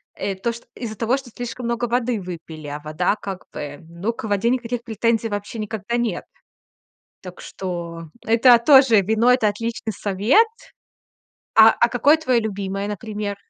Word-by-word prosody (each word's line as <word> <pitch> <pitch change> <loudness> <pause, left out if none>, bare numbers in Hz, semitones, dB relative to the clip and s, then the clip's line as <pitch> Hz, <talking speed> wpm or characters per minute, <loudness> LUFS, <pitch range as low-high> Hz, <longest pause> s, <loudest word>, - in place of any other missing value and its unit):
э, 195 - -3
то 230 +5 -2
чт 235 - -12
из-за 225 -3 -6
того, 230 +5 0
что 270 -3 -10
слишком 245 0 -6
много 235 0 -1
воды 240 -2 -1
выпили, 165 -4 -8
а 145 +1 -5
вода 155 +6 -1
как 195 -3 -7
бы, 145 -1 -7
ну, 180 +7 -3
к - - -9
воде 205 +2 +1
никаких 245 -1 -2
претензий 225 0 0
вообще 205 +2 -5
никогда 215 +2 -3
нет. 240 -2 -2 1.0
Так 180 -1 -10
что, 170 -3 -6 0.2
это 235 +2 +6
тоже, 265 -7 +7
вино- 220 +5 +2
это 225 -4 +2
отличный 225 +1 -4
совет. 210 - +3 1.1
А, 220 0 +9
а 235 - +2
какое 260 +6 +4
твоё 260 -7 +1
любимое, 200 -2 -3
например? 210 -1 -4
220 Hz, 160 wpm, -22 LUFS, 195-235 Hz, 1.1 s, А